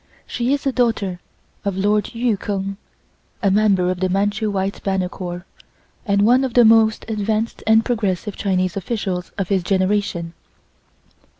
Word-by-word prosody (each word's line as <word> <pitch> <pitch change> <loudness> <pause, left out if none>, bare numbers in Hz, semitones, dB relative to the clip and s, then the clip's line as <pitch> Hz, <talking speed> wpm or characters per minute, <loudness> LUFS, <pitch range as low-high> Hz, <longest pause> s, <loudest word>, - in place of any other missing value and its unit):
She 245 +1 -2
is 280 0 0
a 270 - +2
daughter 225 -8 0 0.4
of 200 -2 -2
Lord 205 +2 0
Yu 235 -1 +1
Keng, 195 0 -4 0.7
a 200 - +3
member 195 -3 +3
of 185 - -4
the 185 0 0
Manchu 205 +3 0
White 195 0 -2
Banner 190 -2 -1
Corps, 175 -1 -6 0.6
and 200 0 +3
one 250 +5 +4
of 255 -3 -3
the 240 -1 +7
most 220 -1 +4
advanced 220 +1 -2
and 220 0 +5
progressive 210 -4 -1
Chinese 185 -3 0
officials 190 -3 -3
of 195 -3 -2
his 195 -2 +2
generation. 185 -2 0
200 Hz, 155 wpm, -20 LUFS, 190-220 Hz, 0.7 s, the